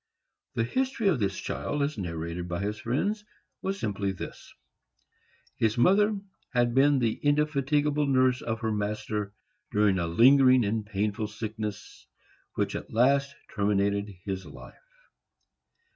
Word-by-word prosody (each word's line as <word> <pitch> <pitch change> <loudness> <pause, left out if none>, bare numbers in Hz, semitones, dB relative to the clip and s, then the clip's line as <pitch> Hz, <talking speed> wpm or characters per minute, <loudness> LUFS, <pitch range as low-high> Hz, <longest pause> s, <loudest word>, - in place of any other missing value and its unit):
The 115 - +1
history 255 - -1
of 160 -9 +1
this 100 -2 -1
child, 75 - -2
as 145 +1 -1
narrated 85 -1 -4
by 85 0 -3
his 105 +1 -3
friends, 200 - -1 0.4
was 195 +1 -2
simply 100 - -1
this: 85 -3 -8 1.1
His 110 0 +1
mother 205 - +4 0.4
had 120 -1 +3
been 140 +2 +4
the 115 -4 +1
indefatigable 145 0 +1
nurse 130 -2 +3
of 110 0 -3
her 110 -1 0
master, 105 0 -3 0.4
during 105 -3 +3
a 85 - -1
lingering 130 +6 +6
and 110 +1 -1
painful 105 +1 -2
sickness, 105 -1 -6 0.5
which - - -1
at - - -6
last 140 +4 +2 0.2
terminated 100 -1 0
his 95 -2 -3
life. - - -13
110 Hz, 130 wpm, -28 LUFS, 100-140 Hz, 1.1 s, lingering